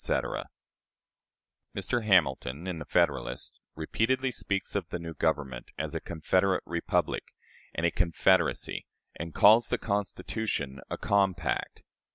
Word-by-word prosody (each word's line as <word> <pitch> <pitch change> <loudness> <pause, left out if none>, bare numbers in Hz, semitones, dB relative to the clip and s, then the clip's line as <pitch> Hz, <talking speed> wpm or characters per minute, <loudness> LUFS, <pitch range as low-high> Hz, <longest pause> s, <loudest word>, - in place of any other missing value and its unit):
Mr. 120 -2 -1
Hamilton, 80 -6 +2
in 90 -3 -3
the 75 - -6
"Federalist," - - 0 0.2
repeatedly 130 +11 0
speaks 100 -4 -1
of 100 -5 -1
the - - -3
new 85 -1 -6
government 75 -7 -1
as - - -3
a - - -1
"confederate 95 +4 +1
republic" 85 0 -1 0.5
and 80 - 0
a 85 - +3
"confederacy," 95 +3 +2 0.3
and 85 0 -6
calls 110 +3 +7
the - - +1
Constitution 100 - -2
a - - -3
"compact." 100 -2 0
90 Hz, 120 wpm, -29 LUFS, 80-100 Hz, 0.5 s, calls